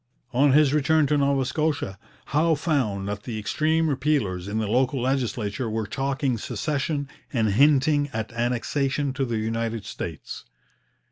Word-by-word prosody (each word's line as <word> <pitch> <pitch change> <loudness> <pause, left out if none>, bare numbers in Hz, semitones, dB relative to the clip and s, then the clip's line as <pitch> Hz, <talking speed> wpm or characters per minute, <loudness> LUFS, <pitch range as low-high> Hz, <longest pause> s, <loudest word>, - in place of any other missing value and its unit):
On 135 +2 +4
his 145 -1 +5
return 155 +1 +3
to 150 +1 +2
Nova 140 -1 +2
Scotia, 145 - -1 0.3
Howe 160 +2 +3
found 125 - -1
that 105 0 -4
the 115 0 -5
extreme 155 +9 +1
repealers 130 - 0
in 105 +2 -2
the 110 - 0
local 130 +5 +1
legislature 120 -3 -1
were 110 0 -2
talking 135 +2 -1
secession 140 +6 -2 0.2
and 115 -5 +1
hinting 145 +4 +4
at 110 0 -4
annexation 130 +4 -1
to 135 0 -1
the 120 -2 -2
United 115 0 -2
States. - - -6
130 Hz, 145 wpm, -25 LUFS, 110-145 Hz, 0.3 s, his